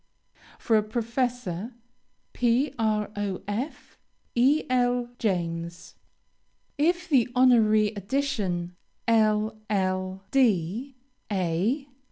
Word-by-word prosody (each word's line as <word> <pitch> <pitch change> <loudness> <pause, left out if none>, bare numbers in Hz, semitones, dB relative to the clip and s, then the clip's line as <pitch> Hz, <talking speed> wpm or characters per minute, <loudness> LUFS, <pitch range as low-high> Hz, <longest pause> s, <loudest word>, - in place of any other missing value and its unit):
For 225 - +2
a - - +4
professor: 230 -2 -2 0.6
PROF. 215 -2 -1 0.4
E. 270 +6 +4
L. 245 -1 +1
JAMES. 170 -4 -3 0.8
If 345 +4 +2
the 260 -7 +3
honorary 220 -4 +5
addition, 200 -5 -2 0.3
LL.D., 215 - +1 0.4
A. 195 - 0
220 Hz, 65 wpm, -26 LUFS, 195-250 Hz, 0.8 s, honorary